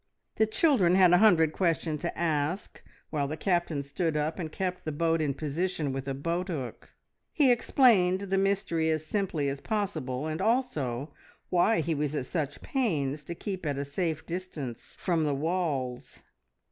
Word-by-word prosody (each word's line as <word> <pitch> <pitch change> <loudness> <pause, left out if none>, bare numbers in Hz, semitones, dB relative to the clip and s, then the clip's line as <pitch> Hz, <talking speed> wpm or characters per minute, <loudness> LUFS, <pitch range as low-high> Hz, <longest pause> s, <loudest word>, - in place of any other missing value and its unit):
The 220 - +4
children 215 - +3
had 185 -2 +6
a 175 - +6
hundred 165 -7 +5
questions 165 -4 0
to 170 - -3
ask, 160 +2 -1 0.3
while 145 -3 0
the 155 +3 -4
Captain 175 -5 0
stood 155 +3 -1
up 155 +4 -1
and 160 -3 -4
kept 180 0 -3
the 155 - -3
boat 165 +2 +1
in 140 -3 0
position 155 -1 -2
with 135 0 -4
a 135 - -2
boat 170 +6 -2
hook. 140 -9 -6 0.4
He 280 -5 +4
explained 215 -7 +4
the 195 -1 -1
mystery 195 -5 +1
as 155 -1 0
simply 175 -6 -1
as 140 0 -3
possible, 155 - -2
and 155 0 -3
also 150 - 0 0.4
why 180 +2 +3
he 160 +1 -1
was 150 0 -1
at 130 - -2
such 145 -2 -3
pains 155 - -1
to 170 - -5
keep 190 0 -5
at 145 -3 -1
a 140 - -2
safe 160 +2 -2
distance 165 -9 -6
from 170 -4 +1
the 145 -2 +1
walls. 145 -6 -2
165 Hz, 170 wpm, -29 LUFS, 145-185 Hz, 0.4 s, had